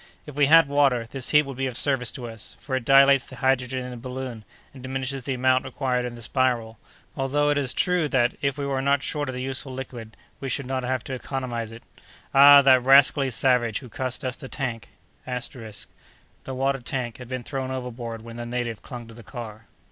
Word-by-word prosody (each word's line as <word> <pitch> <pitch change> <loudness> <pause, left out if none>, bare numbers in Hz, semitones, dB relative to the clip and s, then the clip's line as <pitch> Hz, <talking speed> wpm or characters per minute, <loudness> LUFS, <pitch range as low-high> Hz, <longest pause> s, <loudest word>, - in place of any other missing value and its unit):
"If 150 - -9
we 145 -1 +4
had 165 0 +7
water, 140 -4 +2
this 125 +2 -4
heat 150 0 +5
would 135 -3 -8
be 135 0 -1
of 125 -2 -4
service 135 -4 +1
to 125 -3 -6
us, 115 -2 -11
for 130 - -4
it 130 - -2
dilates 135 0 +6
the 130 - -12
hydrogen 130 -1 0
in 125 - -7
the 125 - -7
balloon, 125 -2 -6 0.3
and 130 - -12
diminishes 130 0 -4
the 135 - -1
amount 130 +1 +2
required 130 -2 -1
in 120 -1 -5
the 120 - -10
spiral, 120 -3 0 0.4
although 145 +2 +1
it 145 - +1
is 135 -2 0
true 180 -4 +1
that, 125 -3 +1
if 140 -1 0
we 140 - -3
were 135 -1 -1
not 140 0 +2
short 145 -3 -2
of 130 - -4
the 125 - -4
useful 135 +1 -3
liquid, 125 -4 -8 0.2
we 135 - -4
should 135 +2 -2
not 130 0 -2
have 130 0 -1
to 135 - -6
economize 125 -3 -4
it. 115 +1 -12 0.5
Ah! 140 +1 +9
that 130 -2 +6
rascally 135 +1 +5
savage 120 -1 +2
who 125 - -9
cost 130 +3 -4
us 130 -1 -2
the 135 - -10
tank!" 115 -7 -4 0.3
The 125 -4 -7 0.6
water 135 +1 0
tank 120 -2 -4
had 125 - -9
been 130 -1 -4
thrown 135 -1 -4
overboard 120 -3 -5
when 115 0 -9
the 120 - -5
native 120 -2 -3
clung 120 -3 -9
to 115 - -12
the 115 - -12
car. 115 -2 -9
130 Hz, 215 wpm, -25 LUFS, 120-135 Hz, 0.6 s, Ah